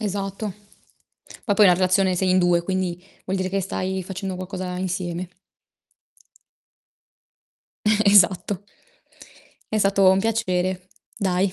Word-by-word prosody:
Esatto, 200 0 -3 1.0
ma 205 - +2
poi 210 - +5
una 180 - +6
relazione 185 +1 +2
sei 185 +1 0
in 185 - +4
2 175 -1 +3
quindi 180 -1 -3 0.2
vuol 190 - -2
dire 185 0 -2
che 195 +1 -1
stai 190 0 -3
facendo 190 0 -5
qualcosa 185 -1 -5
insieme. 180 -1 -3 2.6
Eh, 215 0 +3
esatto. 200 0 +3 1.1
È 220 - -1
stato 195 -1 +4
un 190 - +3
piacere, 185 -4 -1 0.3
dai. 190 -1 0
185 Hz, 120 wpm, -23 LUFS, 180-195 Hz, 2.6 s, una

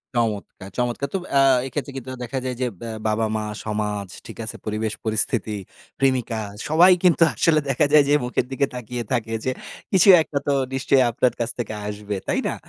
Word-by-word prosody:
চমৎকার। 105 -4 -2
চমৎকার 125 +3 -1
তো - - +1 0.2
অ্যা 140 - +5 0.3
এক্ষেত্রে 140 0 -4
কিন্তু 130 0 -7
দেখা 130 +2 -3
যায়, 125 -1 -2
যে 125 - +1
ব্য - - -6 0.2
বাবা-মা 110 0 0 0.2
সমাজ 105 -2 -2 0.2
ঠিক - - -10
আছে - - -6
পরিবেশ 110 0 -2
পরিস্থিতি, 110 -1 0 0.4
প্রেমিকা 130 -4 +1 0.3
সবাই 175 +4 +7
কিন্তু 170 -2 +5
আসলে 155 -2 +3
দেখা 135 +3 +3
যায় 150 -2 +8
যে - - +4
মুখের 125 0 -1
দিকে 140 +1 +1
তাকিয়ে 120 0 -5
থাকে, 115 -2 -1
যে 130 - +1 0.4
কিছু 190 +1 +5
একটা 150 -2 -3
তো 140 - +3 0.2
নিশ্চয়ই 135 0 +3
আপনার 125 +2 +1
কাছ 115 0 -1
থেকে 110 -2 -3
আসবে। 105 0 -4
তাই - - +1
না? - - -2
120 Hz, 180 wpm, -23 LUFS, 110-135 Hz, 0.4 s, যায়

